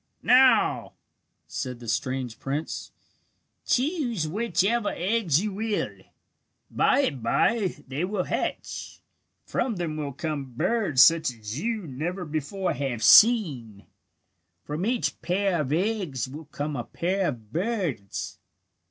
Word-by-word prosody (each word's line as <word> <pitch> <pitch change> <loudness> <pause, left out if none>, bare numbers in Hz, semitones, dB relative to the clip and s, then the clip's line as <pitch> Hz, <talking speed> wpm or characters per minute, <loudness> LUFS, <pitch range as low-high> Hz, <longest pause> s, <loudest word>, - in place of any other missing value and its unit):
"Now," 260 +1 +4 0.5
said 125 -3 -5
the 120 - -10
strange 125 +1 -2
prince, 145 +4 -4 0.8
"choose 250 - 0
whichever 210 +3 +1
eggs 185 -4 +1
you 210 -2 -2
will. 215 +1 -2 0.8
By - - +3
and 140 - -1
bye 195 - +1
they 140 +5 -3
will 190 0 -1
hatch. - - -4 0.5
From 240 -4 -1
them 165 -4 -3
will 145 -2 -3
come 140 -3 -4
birds 160 - +3
such 165 -3 +5
as 110 +1 -7
you 220 0 -2
never 170 +7 -4
before 155 +5 -2
have 130 -5 -3
seen. 140 - +5 0.8
From 155 +7 -3
each 245 -1 -1
pair 185 -2 +1
of 140 -2 -3
eggs 175 - -1
will 150 +5 -9
come 145 0 -4
a 120 - -3
pair 185 +8 -1
of 115 -7 -6
birds." 175 - -3
165 Hz, 125 wpm, -26 LUFS, 135-210 Hz, 0.8 s, such